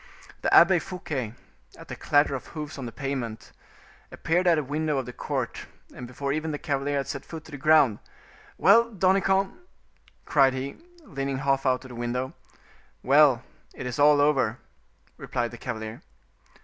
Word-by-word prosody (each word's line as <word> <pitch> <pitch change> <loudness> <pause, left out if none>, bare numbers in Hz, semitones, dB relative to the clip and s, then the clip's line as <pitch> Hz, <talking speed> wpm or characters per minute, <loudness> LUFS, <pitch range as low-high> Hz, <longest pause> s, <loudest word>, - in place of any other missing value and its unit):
The - - 0
Abbe 175 +1 +7
Fouquet, 140 - -5 0.4
at - - -13
the - - -6
clatter 145 0 +2
of 130 - -5
hoofs 150 -2 -6
on 130 - -5
the - - -7
pavement, 130 -5 -5 0.6
appeared 175 +3 0
at 170 -2 +5
a 150 - 0
window 150 +2 -1
of 135 - -2
the 125 - -8
court, - - -4 0.3
and 125 - -8
before 140 +3 -3
even 155 +2 -2
the 150 - -3
cavalier 140 0 -2
had 135 - -2
set - - -5
foot 160 -2 -9
to - - -13
the 145 - -6
ground, 145 -6 +4 0.6
"Well! 230 +4 +5
Danicamp?" 195 -1 +2 0.7
cried 135 -3 +4
he, 135 +2 -5 0.3
leaning 135 - -4
half 135 0 0
out 130 +1 +1
of - - -10
the - - -10
window. 120 +2 -3 0.7
"Well, 135 -2 +5 0.3
it - - -7
is 125 +2 -4
all 145 0 +6
over," 135 -6 +2 0.6
replied 120 -1 -3
the 120 - -10
cavalier. 110 -2 -6
140 Hz, 170 wpm, -26 LUFS, 125-155 Hz, 0.7 s, Abbe